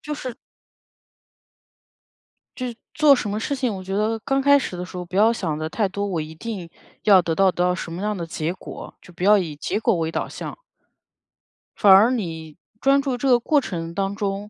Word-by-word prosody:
就 300 - -5
是 255 -4 -6 2.2
就 255 - -3
是 240 - -6 0.2
做 300 -2 +6
什 215 - -3
么 210 +1 -2
事 280 +5 -2
情， 250 -5 -1
我 190 - -7
觉 190 +1 -5
得 220 +2 0
刚 270 +4 0
开 285 +1 +6
始 260 - -4
的 180 - -4
时 185 - -9
候 180 - -5
不 180 - -9
要 215 +3 +5
想 170 -9 -2
得 155 0 -4
太 200 +4 0
多：” 200 +1 -3
我 180 -5 -2
一 155 +1 -8
定 195 -3 -6 0.3
要 200 -3 +6
得 165 - -2
到 195 -1 +4
得 175 - -1
到 180 0 +2
什 175 - -6
么 170 +3 -5
样 210 +1 -1
的 170 - -4
结 165 0 -3
果“， 185 - -10
就 180 - -16
不 175 +1 -7
要 210 +1 +6
以 165 -6 -3
结 150 - -2
果 - - +2
为 165 -1 -1
导 - - -2
向。 - - -8 1.2
反 200 - +5
而 215 +6 +7
你 160 -9 -4 0.2
专 275 +1 +4
注 270 -3 -2
这 270 +2 0
个 245 -1 +5
过 290 +4 +2
程 170 -6 -5
当 195 +2 -2
中， 205 0 -3
200 Hz, 240 characters per minute, -22 LUFS, 175-235 Hz, 2.2 s, 而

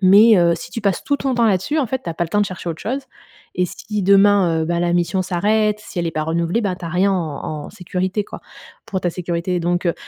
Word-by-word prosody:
Mais, 205 +4 +7
heu, 170 -1 +4
si 170 - -8
tu 230 - -5
passes 195 -3 0
tout 285 - 0
ton 270 -2 -1
temps 235 -1 +3
là-dessus, 215 - +1
en 275 - +1
fait, 260 +3 -3
tu 170 - -3
as - - -6
pas 175 - -2
le - - -7
temps 205 +3 +1
de 205 - +2
chercher 185 -2 -6
autre 160 -1 -5
chose 260 +5 -2 0.6
et 180 - +2
si 210 +3 -5
demain, 195 -4 +4
heu, - - 0
ben, 170 0 0
la 175 0 +1
mission 175 +2 +1
s'arrête, 210 +4 +1
si 185 - -8
elle 170 - 0
est - - -1
pas 155 0 -2
renouvelée, 170 +6 0
bah, 190 -4 -1
tu 175 - -9
as - - -3
rien 185 +4 +2
en 155 -3 -3
en - - -10
sécurité 185 +1 -2
quoi, - - -10 0.5
pour 190 - -3
ta 175 - 0
sécurité». 175 +1 -2
Donc 175 +1 0
heu, 170 - +1
185 Hz, 275 wpm, -20 LUFS, 170-210 Hz, 0.6 s, Mais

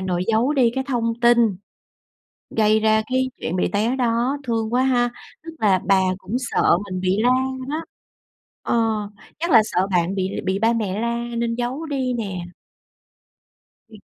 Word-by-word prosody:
nội 180 -1 -1
giấu 230 +5 +2
đi 255 -5 +3
cái 265 0 -1
thông 235 -4 0
tin 235 -4 +4 0.9
gây 215 0 +3
ra 220 0 +3
cái 260 +1 0
chuyện 170 - -3
bị 180 - +1
té 220 +5 +1
đó, 245 +2 0
thương 225 -2 -2
quá 255 - +3
ha. 245 -2 +2 0.3
Tức 330 - -8
là 195 -4 +3
bà 195 0 +4 0.2
cũng 195 +4 -4
sợ 255 -8 +2
mình 185 -2 -5
bị 185 +2 0
la 245 - +4 0.4
đó. 310 +3 -3 0.8
Ờ, - - 0 0.6
chắc 340 +2 -2
là 230 - +8
sợ 190 -3 0
bạn 180 0 +1
bị 190 -1 -2
bị 190 +1 0
ba 225 +3 +3
mẹ 210 -4 -2
la 235 0 -1 0.2
nên 230 0 -1
giấu 250 +6 -3
đi 265 -4 -1
nè. 195 -7 -4 1.4
Ừm. 220 -1 -14
230 Hz, 170 wpm, -22 LUFS, 195-250 Hz, 1.4 s, là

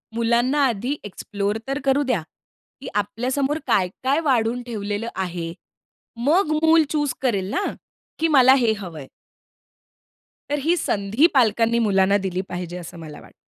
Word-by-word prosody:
मुलांना 240 +5 +2
आधी 245 +4 -2
एक्सप्लोर 205 +1 -3
तर 275 +1 -2
करू 275 +1 +3
द्या. 250 -9 0 0.6
की 270 - -8
आपल्या 210 +5 -1
समोर 280 +2 0
काय, 185 -3 +3 0.2
काय 275 +4 +2
वाढून 245 -4 +1
ठेवलेलं 210 -1 -4
आहे? 175 -3 -4 0.7
मग 325 0 +3
मूल 320 0 +6
चूज 295 -3 0
करेल 200 -7 0
ना, 405 - 0 0.6
की 330 - +2
मला 265 -4 +6
हे 235 -4 +2
हवंय. 160 -8 -8 1.4
तर 290 - 0
ही 330 +5 +2
संधी 215 +6 +2
पालकांनी 230 -2 +3
मुलांना 200 -2 +3
दिली 190 -2 -2
पाहिजे 180 0 -5
असं 175 0 -9
मला 155 -2 -9
वाटतं. - - -21
230 Hz, 145 wpm, -22 LUFS, 195-275 Hz, 1.4 s, मूल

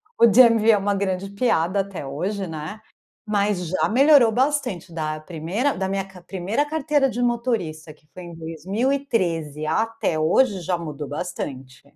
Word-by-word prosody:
O 235 - +6
DMV 230 0 +6
é 215 - +7
uma 200 +1 0
grande 195 -1 -2
piada 200 -4 +1
até 195 -7 -4
hoje, 190 +9 -3
né, 160 +6 -6 0.5
mas 205 -4 0
já 185 - 0
melhorou 270 -1 +6
bastante 250 - -1
da 155 -1 -3
1ª, 175 - -2
da 190 0 -2
minha 195 0 -2
ca 190 -2 -14
1ª 195 +10 -2
carteira 295 -3 +1
de 245 - -5
motorista, 230 -11 -2
que 150 0 -30
foi 180 - -9
em 170 -1 -9
2013, 170 - -2
até 220 0 -1
hoje 190 +4 +2
já 175 +1 -1
mudou 150 -3 -6
bastante. 135 -4 -6
195 Hz, 155 wpm, -23 LUFS, 160-230 Hz, 0.5 s, é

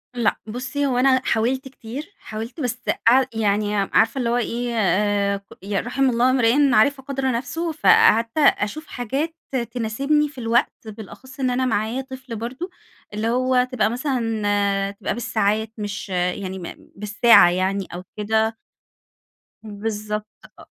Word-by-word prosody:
لأ 235 -3 +1
بُصّي 260 +5 -3
هو 255 -3 0
أنا 260 0 +4
حاولت 255 +4 0
كتير، 265 - -9
حاولت 225 +7 -7
بس 245 -2 -2 0.3
قع 260 +3 +6
يعني 210 -1 0
عارفة 220 +5 +2
اللي 235 -2 0
هو 240 - +1
إيه 240 0 -2
آآ 200 0 +1 0.2
ي 200 -1 -1
رَحِم 260 +2 +1
الله 245 +2 +3
امرئٍ 260 +2 +3
عرف 270 +6 +3
قدر 270 -1 -2
نفسه، 275 +8 -2
فقعدت 315 - +4
أشوف 290 0 +2
حاجات 275 +7 -3 0.4
تناسبني 275 +6 0
في 280 - -18
الوقت 235 +1 +1
بالأخص 225 +5 -11
إن 260 -1 +1
أنا 255 +1 0
معايا 225 +2 -1
طفل 260 -3 -8
برضه، 255 - -5 0.4
اللي 215 +2 -2
هو 255 +1 +2
تبقى 230 -4 +1
مثلًا 210 -6 0
تبقى 200 - -4
بالساعات، 220 -2 0
مش 205 -1 -5
يعني 185 +1 -2
م - - -9 0.3
بالساعة 210 -1 +5
يعني 190 +2 -1
أو 180 - -6
كده. 220 +1 0 1.1
بالضبط 210 0 -4 0.3
أ - - -13
230 Hz, 140 wpm, -22 LUFS, 210-260 Hz, 1.1 s, قع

